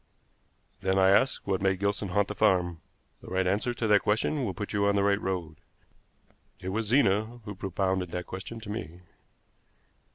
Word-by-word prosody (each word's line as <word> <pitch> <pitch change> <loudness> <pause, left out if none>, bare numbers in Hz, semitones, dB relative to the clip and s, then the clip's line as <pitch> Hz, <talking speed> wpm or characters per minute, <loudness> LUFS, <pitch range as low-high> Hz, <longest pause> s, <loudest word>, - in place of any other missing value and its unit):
"Then, 95 0 0
I 95 0 +5
ask, 130 +7 +2
what 95 -2 0
made 95 -1 +2
Gilson 100 +1 -1
haunt 100 +2 +1
the - - -4
farm? 90 -6 +2 0.4
The - - -13
right 95 0 0
answer 100 +6 +1
to 115 - -2
that 105 -2 +5
question 110 +7 0
will 100 -6 -2
put 105 -1 -5
you 100 0 +2
on 100 - +2
the 100 - +2
right 100 0 +2
road. 85 -5 -3 1.0
It 90 - -5
was 110 +3 -2
Zena 115 -1 +2
who 105 - -5
propounded 95 -1 -1
that 90 +1 -4
question 95 +5 -7
to 105 -2 -7
me." 90 -5 -6
100 Hz, 185 wpm, -28 LUFS, 95-105 Hz, 1.0 s, I